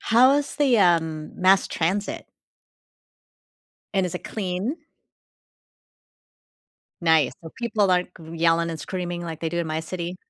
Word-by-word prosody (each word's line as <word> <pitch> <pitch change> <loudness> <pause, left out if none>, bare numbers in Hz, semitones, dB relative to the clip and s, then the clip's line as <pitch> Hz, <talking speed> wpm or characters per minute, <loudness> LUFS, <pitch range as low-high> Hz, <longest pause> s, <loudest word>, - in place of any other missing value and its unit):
How's 265 +5 +4
the, 270 -6 +3
um, 160 -4 +2
mass 190 +1 +5
transit? 190 +5 -2 1.7
And 190 -2 +2
is 180 - -6
it - - -6
clean? 195 - -3 2.3
Nice, 160 -5 +4
so 160 - -9
people 215 -5 +1
aren't 180 0 +1
c 165 - -13
yelling 165 0 +2
and 160 - -5
screaming 175 +2 -4
like 160 -2 -6
they 165 - -1
do 170 +1 -3
in 170 - -1
my 155 0 -2
city? 170 +2 -5
175 Hz, 135 wpm, -24 LUFS, 165-195 Hz, 2.3 s, mass